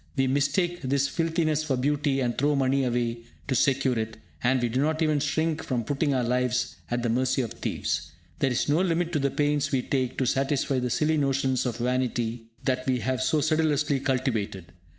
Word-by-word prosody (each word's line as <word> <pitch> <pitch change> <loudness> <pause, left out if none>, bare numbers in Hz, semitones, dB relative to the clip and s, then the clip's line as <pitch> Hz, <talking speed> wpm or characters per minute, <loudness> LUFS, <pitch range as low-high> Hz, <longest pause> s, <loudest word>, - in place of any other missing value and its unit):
We 135 - +2
mistake 145 +7 +1
this 140 0 +1
filthiness 160 -2 0
for 140 -4 0
beauty, 140 +1 +1
and 120 -2 0
throw 145 +2 +2
money 135 0 +2
away 120 -1 -1 0.3
to 135 - 0
secure 130 0 +2
it; 110 0 -4 0.3
and 130 +2 +3
we 120 - +1
do 125 +3 0
not 155 +2 +1
even 155 -2 +2
shrink 155 +2 0
from 125 -3 -1
putting 145 +4 0
our 130 -2 +1
lives 125 0 0
at 120 0 -1
the 120 - 0
mercy 130 +2 +1
of 115 - -5
thieves. - - -3 0.3
There 135 - +2
is 125 - 0
no 150 +4 +3
limit 175 -2 0
to 150 - +2
the 140 0 +1
pains 145 0 0
we 130 -3 +1
take 130 -2 -1
to 130 - +1
satisfy 135 +1 +1
the 125 0 -1
silly 155 +4 +1
notions 135 -2 +1
of 120 -2 -3
vanity 120 -2 -1 0.2
that 130 -1 -1
we 130 -1 +2
have 130 0 -1
so 150 +3 +2
sedulously 150 -2 +1
cultivated. 115 - -2
135 Hz, 200 wpm, -26 LUFS, 125-150 Hz, 0.3 s, and